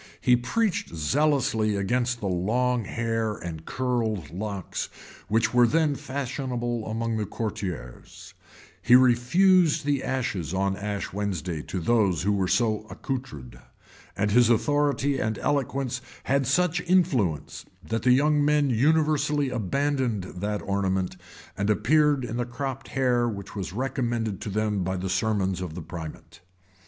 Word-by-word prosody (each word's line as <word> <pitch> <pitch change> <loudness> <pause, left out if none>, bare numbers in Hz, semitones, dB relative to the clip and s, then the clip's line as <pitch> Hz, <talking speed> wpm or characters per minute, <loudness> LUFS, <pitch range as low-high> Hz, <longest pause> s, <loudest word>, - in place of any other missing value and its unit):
He 125 - +4
preached 160 - -1
zealously 110 - +1
against 120 +4 0
the 100 - -2
long 115 +6 0
hair 115 -1 -1
and 80 -4 -7
curled 115 - -1
locks 100 -1 -4 0.4
which 115 +3 +1
were 120 -1 +6
then 155 +2 +2
fashionable 125 -4 -3
among 115 +1 -2
the 105 -2 -2
courtiers; 95 - -6 0.5
he 120 - +6
refused 155 +7 +4
the 145 -2 0
ashes 100 -10 -2
on 95 0 +1
Ash 100 -1 -4
Wednesday 95 -5 -3
to 95 - -4
those 95 -4 +2
who 100 - +2
were 95 -2 +1
so 110 0 +1
accoutred; 75 - -6 0.6
and 105 +1 +1
his 120 +1 +5
authority 145 +2 +2
and 110 0 -1
eloquence 135 -3 -1 0.2
had 135 -1 +1
such 175 +4 +2
influence, 130 - +1 0.2
that 115 0 -1
the 125 - +4
young 145 +2 +3
men 145 -2 +3
universally 150 +1 +2
abandoned 125 -1 0
that 100 +3 -4
ornament, 95 -2 -1 0.4
and 100 +2 -1
appeared 145 +4 +3
in 115 0 -4
the 120 - -1
cropped 135 +2 -5
hair 125 -2 +1
which 100 0 -7
was 95 -3 -4
recommended 120 -3 -2
to - - -4
them 105 -1 0
by 95 +1 -2
the 95 +1 -3
sermons 95 -4 0
of 85 -4 -5
the 90 - -5
primate. 80 -1 -9
115 Hz, 140 wpm, -26 LUFS, 100-135 Hz, 0.6 s, were